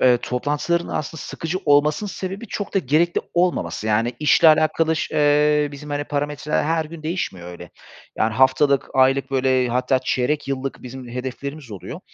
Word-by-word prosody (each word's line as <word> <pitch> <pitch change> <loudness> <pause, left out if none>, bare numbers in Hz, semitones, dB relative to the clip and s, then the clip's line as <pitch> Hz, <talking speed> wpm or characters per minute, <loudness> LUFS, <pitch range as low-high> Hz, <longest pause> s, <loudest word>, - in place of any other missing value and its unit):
eee, 125 -1 +5
toplantıların 150 +8 -1
aslında 155 0 -4
sıkıcı 165 +3 -4
olmasının 150 +7 +3
sebebi 195 +5 -6
çok 205 0 -5
da - - +4
gerekli 165 +3 +1
olmaması, 175 -10 0
yani, 115 +3 +1
işle 155 +2 +5
alakalı 155 +1 +3
ş - - -3
eee, 150 0 +3
bizim, 145 +1 -9
hani, 145 0 -2
parametreler 145 +1 -2
her 160 0 0
gün 155 0 -10
değişmiyor 125 - -4
öyle. 90 -1 -11 0.5
Yani, 110 0 +1
haftalık, 130 +2 +3
aylık, 135 +1 +3
böyle, 130 -1 +2
hatta 125 +2 +1
çeyrek 130 +3 -1
yıllık 135 0 -4
bizim 125 0 -9
hedeflerimiz 130 +2 -6
oluyor. 100 - -8
145 Hz, 160 wpm, -21 LUFS, 130-155 Hz, 0.5 s, eee